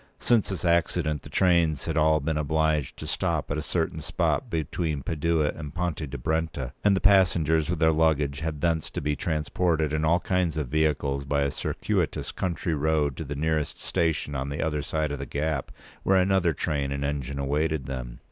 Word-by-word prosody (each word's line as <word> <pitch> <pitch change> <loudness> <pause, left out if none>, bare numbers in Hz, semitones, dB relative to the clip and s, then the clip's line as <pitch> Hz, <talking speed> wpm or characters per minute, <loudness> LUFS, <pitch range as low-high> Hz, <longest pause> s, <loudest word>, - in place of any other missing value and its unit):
Since 115 -4 +2
this 95 -2 -3
accident, 85 -3 +1
the - - -11
trains 85 -5 +2
had - - -2
all 80 0 +4
been 80 +2 -1
obliged 75 -1 0
to - - -7
stop - - -1
at 70 - 0
a - - -2
certain 80 +1 -1
spot - - -1
between 80 -2 -2
Padua 80 -1 +1
and 75 -1 -8
Ponte 85 -4 -2
di 70 - -5
Brenta, 80 -2 -2
and 105 -1 +5
the - - +1
passengers, 80 -6 +4
with 90 - 0
their 80 0 +4
luggage, 75 -3 +2
had 80 -3 -4
thence 80 -2 0
to - - -4
be 75 0 -1
transported 80 0 0
in 75 0 0
all 85 +3 +3
kinds 90 -4 0
of 75 -5 -2
vehicles, 75 -2 +1
by 70 +1 0
a 70 - 0
circuitous - - -2
country 85 -2 -2
road, 75 -2 +1
to - - -5
the 75 -1 -5
nearest 80 0 -1
station 80 -3 -1
on 70 0 -2
the 70 - -4
other 75 -2 -1
side 75 +1 -1
of 70 - -4
the 70 - -5
gap, 75 -1 -2 0.3
where 95 - +3
another 95 -2 +3
train 70 -1 -1
and 70 0 -2
engine 70 -1 -3
awaited 75 +1 0
them. 60 -2 -5
80 Hz, 195 wpm, -26 LUFS, 70-80 Hz, 0.3 s, and